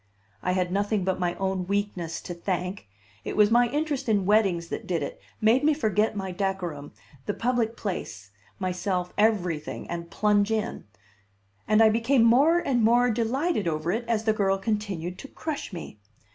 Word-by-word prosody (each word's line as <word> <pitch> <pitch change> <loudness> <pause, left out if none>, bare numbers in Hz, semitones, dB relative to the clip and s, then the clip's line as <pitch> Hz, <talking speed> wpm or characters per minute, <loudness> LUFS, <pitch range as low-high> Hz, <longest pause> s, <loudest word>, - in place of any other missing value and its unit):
I 180 - 0
had 180 -1 0
nothing 205 +1 0
but 190 0 -1
my 175 -1 0
own 190 -1 -2
weakness 195 -4 -2
to 175 - -6
thank; 180 - -3 0.4
it - - -5
was 210 0 +5
my 240 +1 +4
interest 290 -2 -2
in 205 -3 +2
weddings 190 -5 +2
that - - -5
did 170 -5 0
it, - - -6 0.2
made 230 +5 +4
me 305 0 +4
forget 215 -6 +1
my 190 -2 -3
decorum, 180 -6 -3 0.4
the 205 - -1
public 235 -1 0
place, 105 - -5 0.3
myself, 180 -1 -2
everything, 180 -8 0
and 170 0 -5
plunge 210 -1 +2
in. 220 0 -2 0.8
And 215 +1 +5
I 220 - +7
became 230 +3 +3
more 275 +9 +5
and 270 -9 +1
more 240 +2 +4
delighted 240 - 0
over 155 +1 -1
it 225 +5 -1
as 225 -2 0
the 220 -1 +2
girl 195 -2 +1
continued 195 -4 -3
to 275 - -8
crush 305 -2 -5
me. 170 - -8
205 Hz, 175 wpm, -26 LUFS, 180-230 Hz, 0.8 s, I